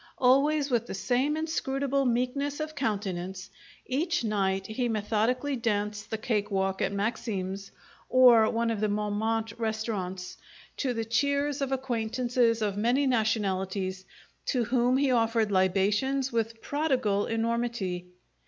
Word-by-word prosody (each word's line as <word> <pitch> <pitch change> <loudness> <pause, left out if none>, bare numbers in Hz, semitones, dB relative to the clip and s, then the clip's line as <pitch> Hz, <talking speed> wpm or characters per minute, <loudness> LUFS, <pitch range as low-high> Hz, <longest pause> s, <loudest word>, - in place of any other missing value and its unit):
Always 280 +3 +3
with 235 -1 +1
the - - -5
same 250 +10 0
inscrutable 275 -3 -1
meekness 255 +4 0
of 310 0 -4
countenance, 190 -7 -3 0.3
each 320 +4 0
night 195 -3 0
he 235 +4 -2
methodically 225 +6 0
danced 210 -3 -2
the 220 - -2
cake 210 -2 -1
walk 190 -1 -1
at - - +1
Maxim's 200 -2 -3 0.4
or 245 -4 +7
one 230 0 0
of 220 - -2
the 215 - +1
Montemarte 210 +2 -1
restaurants, 205 -5 -3 0.4
to 255 -3 -1
the 225 0 -2
cheers 280 +4 0
of 275 -1 -1
acquaintances 240 -2 0
of 205 -1 -1
many 245 +6 +2
nationalities, 195 -5 0 0.4
to 250 -3 +1
whom 245 +2 +2
he 275 -1 +2
offered 225 -3 +2
libations 205 +8 +1
with 230 -1 -2
prodigal 255 -9 0
enormity. 225 -6 -1
225 Hz, 130 wpm, -28 LUFS, 205-255 Hz, 0.4 s, or